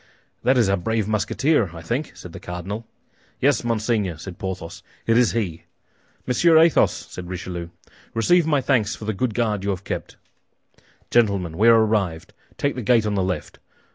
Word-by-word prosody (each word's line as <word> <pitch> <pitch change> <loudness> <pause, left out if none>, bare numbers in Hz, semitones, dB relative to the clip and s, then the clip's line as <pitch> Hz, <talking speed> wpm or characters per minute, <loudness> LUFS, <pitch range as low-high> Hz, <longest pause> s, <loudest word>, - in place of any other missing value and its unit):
"That 130 +1 +3
is 115 -4 +4
our 100 0 +2
brave 110 +3 -1
Musketeer, 110 - +1
I 85 - -9
think," 125 - -3
said 90 - -11
the - - -8
cardinal. 95 +6 -6 0.5
"Yes, 140 0 +2
monseigneur," 110 -6 0
said 90 +3 -9
Porthos, 95 0 -5 0.2
"it 115 - +3
is 120 -1 +4
he." 95 -9 -3 0.6
"Monsieur 160 +6 +4
Athos," 165 0 +5
said 90 -1 -8
Richelieu, 90 -2 -5 0.5
"receive 170 +9 +3
my 145 -3 +2
thanks 120 -6 +1
for 110 - -9
the 110 - -1
good 110 +2 -2
guard 105 -5 0
you 100 - -1
have 95 -1 -2
kept. - - -5 1.0
Gentlemen, 100 -8 +2
we 110 +6 +3
are 115 -1 +8
arrived; 95 -7 -1 0.2
take 140 -1 0
the 125 - -5
gate 115 0 +3
on 105 - 0
the 100 - +1
left. 90 -4 -3
105 Hz, 175 wpm, -23 LUFS, 95-120 Hz, 1.0 s, are